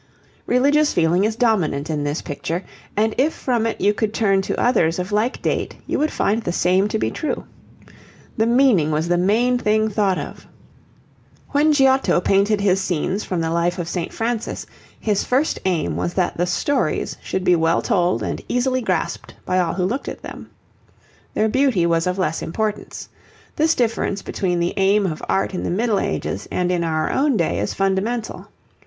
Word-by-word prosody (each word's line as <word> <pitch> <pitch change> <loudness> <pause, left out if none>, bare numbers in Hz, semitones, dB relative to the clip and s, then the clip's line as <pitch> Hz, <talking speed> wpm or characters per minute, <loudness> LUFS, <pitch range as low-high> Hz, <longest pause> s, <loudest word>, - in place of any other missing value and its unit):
Religious 290 +4 +3
feeling 175 +3 +3
is 215 0 -1
dominant 185 -12 +1
in 150 -2 -2
this 145 +2 -2
picture, 165 +4 -4 0.3
and 220 +1 +2
if 295 +4 +3
from 235 -3 0
it 225 - -3
you 205 +2 +3
could 215 +1 -2
turn 195 -3 +2
to - - -3
others 170 -10 +2
of 180 +2 -4
like 215 +5 0
date, - - -1
you - - -1
would 305 +2 +2
find 215 -3 0
the 175 - -2
same 185 +3 +2
to 215 - -1
be - - -1
true. 310 - -3 0.9
The 220 0 +1
meaning 235 - +4
was 155 +2 0
the 175 0 +2
main 235 +7 +2
thing 215 -1 +2
thought 200 -3 +1
of. - - -7 1.0
When 295 +2 +3
Giotto 270 -8 +3
painted 200 +3 +2
his 195 -1 +2
scenes 185 +3 -1
from 180 -3 -2
the 165 0 -1
life 170 +1 0
of 175 -2 -3
St. 170 -1 -3
Francis, 230 0 -3 0.3
his 210 -2 0
first 270 +5 +1
aim 180 -4 0
was 175 - -2
that 185 -2 0
the 175 +1 0
stories 180 - 0
should 190 - -3
be 180 - +4
well 165 0 +2
told 175 - +1
and 85 - -3
easily 255 +1 0
grasped 185 -7 -2
by 185 - +1
all 175 -2 0
who 180 -1 0
looked 245 +9 -2
at - - -9
them. - - -9 0.9
Their 215 - +2
beauty 235 -6 +2
was 165 0 +1
of 180 +1 -1
less 165 -4 -1
importance. 215 +4 -3 0.5
This 320 +2 +2
difference 225 -4 -1
between 180 -3 -1
the 170 +1 0
aim 200 +1 +3
of 155 -4 -3
art 195 - 0
in 180 - -3
the - - -2
Middle 210 +2 +1
Ages - - -3
and 180 0 0
in 175 -1 0
our 155 -1 0
own 275 -3 +2
day 170 - 0
is 105 - -2
fundamental. 200 +4 -1
195 Hz, 185 wpm, -21 LUFS, 175-230 Hz, 1.0 s, meaning